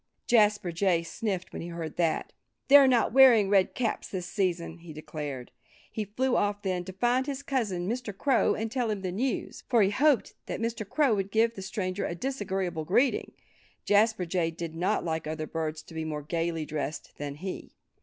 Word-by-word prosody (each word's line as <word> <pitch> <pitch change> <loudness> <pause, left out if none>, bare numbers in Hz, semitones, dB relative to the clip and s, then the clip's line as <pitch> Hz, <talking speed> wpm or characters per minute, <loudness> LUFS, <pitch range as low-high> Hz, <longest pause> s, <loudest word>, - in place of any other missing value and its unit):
Jasper 210 -5 +3
Jay 170 -1 +1
sniffed 190 0 -4
when - - -5
he 170 - -6
heard 170 -2 -6
that. 165 -2 0 0.4
"They're 280 -1 +9
not 245 -3 +3
wearing 245 -7 +7
red 195 -2 +3
caps 235 -3 -1
this 185 -3 -4
season," 175 -3 -2
he 165 -2 -10
declared. 150 -4 -6 0.4
He 215 - -3
flew 250 +6 0
off 205 0 0
then, 185 -2 -1
to 190 - -7
find 245 +6 +1
his 280 -1 -4
cousin 210 -11 -1
Mr. 225 -3 -4
Crow 265 -1 +2
and 220 0 -3
tell 245 -2 0
him 205 -2 -3
the 185 - -2
news. 245 +7 -2
For 235 -4 +5
he 195 - +2
hoped 275 +2 +2
that - - -4
Mr. 225 -3 -3
Crow 290 -6 +3
would 195 -1 -1
give 225 +2 +2
the 195 - -8
stranger 190 -1 -3
a 170 - -4
disagreeable 190 -8 -2
greeting. 240 - +1 0.5
Jasper 210 -2 +3
Jay 170 -1 0
did 165 0 -6
not 175 +2 0
like 160 -2 -2
other 155 0 -3
birds 160 -1 -4
to - - -14
be 160 0 -3
more 150 -2 -4
gayly 165 0 -2
dressed 150 0 -5
than 145 -1 -4
he. 185 +5 -6
190 Hz, 195 wpm, -28 LUFS, 165-230 Hz, 0.5 s, They're